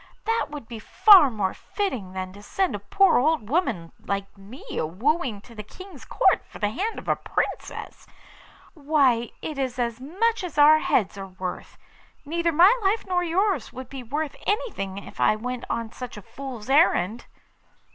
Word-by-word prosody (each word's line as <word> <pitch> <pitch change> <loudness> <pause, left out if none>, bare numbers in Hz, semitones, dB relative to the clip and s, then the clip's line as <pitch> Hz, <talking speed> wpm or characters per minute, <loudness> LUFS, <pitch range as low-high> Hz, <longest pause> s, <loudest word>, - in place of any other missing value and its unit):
That 455 +1 0
would 290 -6 -8
be 230 -2 -8
far 375 - +7
more 205 -5 -2
fitting 255 - -4
than 185 0 -5
to 205 - -13
send 375 - -1
a 205 - -3
poor 380 - +3
old 290 -5 +1
woman 220 - 0
like 200 0 -4
me 200 +6 -13
a - - -1
wooing 225 - -1
to 235 - -16
the 215 - -7
King's 375 - -12
Court - - +2
for - - -12
the 205 -1 -1
hand 405 - -3
of - - -9
a - - +3
Princess. - - -4 0.7
Why, 280 -6 +2
it 300 -3 -4
is 260 -2 -2
as 235 -1 -2
much 390 - 0
as 345 -5 -6
our 300 +1 +7
heads 200 -8 0
are 195 - -6
worth. 185 -1 -7 0.5
Neither 335 +3 0
my 355 +9 +6
life 405 +3 +1
nor 360 -1 0
yours 355 - 0
would 260 -1 -9
be 270 -1 -7
worth 290 +5 -3
anything 290 - -2
if 200 - -10
I - - +4
went 250 +3 -5
on 230 -1 -3
such 250 -2 -8
a 210 - -10
fool's 255 -4 -8
errand. 240 - +2
260 Hz, 180 wpm, -25 LUFS, 210-340 Hz, 0.7 s, far